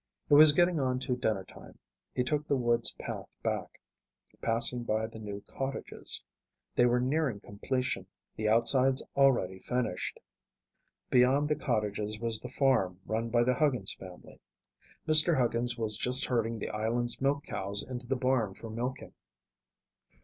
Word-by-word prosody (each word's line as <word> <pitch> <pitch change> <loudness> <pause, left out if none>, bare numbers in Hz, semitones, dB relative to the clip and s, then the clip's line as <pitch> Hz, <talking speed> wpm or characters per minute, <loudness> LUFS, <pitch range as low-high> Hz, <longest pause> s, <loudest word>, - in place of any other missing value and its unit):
It - - +6
was 150 +1 +10
getting 175 +1 +2
on 130 -2 0
to 125 - -1
dinnertime. 110 -6 -4 0.4
He 125 - +1
took 150 +3 -1
the 140 - +2
woods 120 -2 +1
path - - -7
back, - - -3 0.6
passing 120 +1 0
by 110 -1 0
the 110 0 -9
new 100 -2 -6
cottages. 135 0 -4 0.5
They 120 - +5
were 120 0 +2
nearing 130 -3 0
completion, 105 -1 -3 0.3
the 110 0 -1
outsides 130 +4 +3
already 120 -10 +3
finished. 125 -7 -3 0.9
Beyond 130 +4 +4
the 150 - +2
cottages 105 -5 -2
was 115 -1 0
the 125 - -8
farm 120 -10 +1
run 115 +1 -2
by 120 +1 +3
the 125 +1 +2
Huggins 125 -8 0
family. 90 -1 -13 0.7
Mr. 155 +1 +6
Huggins 120 -1 0
was 110 -2 -1
just 125 +3 +4
herding 115 -2 -1
the - - -5
island's 115 +4 -2
milk 140 +1 +1
cows 100 +1 -2
into 125 -1 -6
the 135 - 0
barn 125 -6 0
for 115 - -9
milking. 125 +4 -5
120 Hz, 150 wpm, -30 LUFS, 110-135 Hz, 0.9 s, was